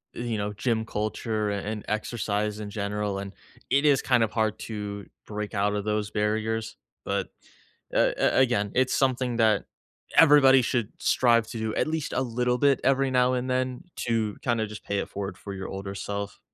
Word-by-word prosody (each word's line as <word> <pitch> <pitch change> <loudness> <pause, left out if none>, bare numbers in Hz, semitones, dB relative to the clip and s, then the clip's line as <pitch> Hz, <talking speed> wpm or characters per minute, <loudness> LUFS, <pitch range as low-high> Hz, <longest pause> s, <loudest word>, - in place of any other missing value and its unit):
e 120 - -4
you 115 -3 -2
know, 105 0 -2
gym 110 +2 -1
culture 110 0 -2
and 105 +1 -3
exercise 105 -1 -2
in 105 -1 -5
general, 105 -1 -2
and 100 0 -6 0.4
it 140 +2 +3
is 140 -3 +5
kind 125 -2 +3
of 110 - -1
hard 110 0 0
to, 105 -2 -5 0.2
break 105 0 -5
out 100 0 +1
of 105 -1 -3
those 105 -1 -1
barriers. 110 +1 -1 0.3
But, - - -1 0.6
a - - +3 0.2
a - - +6
again, 120 -6 +2
it's 130 0 +2
something 130 -2 +1
that, 110 -4 +3 0.5
everybody 140 -4 +7
should, 120 -3 -1
strive 115 -3 +3
to 115 - -6
do 110 -1 -2
at - - +1
least 160 -2 -2
a - - +1
little 125 0 0
bit 140 +1 +3
every 135 0 +2
now 125 0 +3
and 125 0 -1
then 130 +2 -1 0.3
to 110 -3 0
kinda 115 -3 0
just 105 0 -9
pay 100 0 -1
it - - -3
forward 100 -2 -5
for 100 - -7
your 95 -1 -5
older 95 0 -6
self. 100 0 -5
110 Hz, 190 wpm, -26 LUFS, 105-125 Hz, 0.6 s, everybody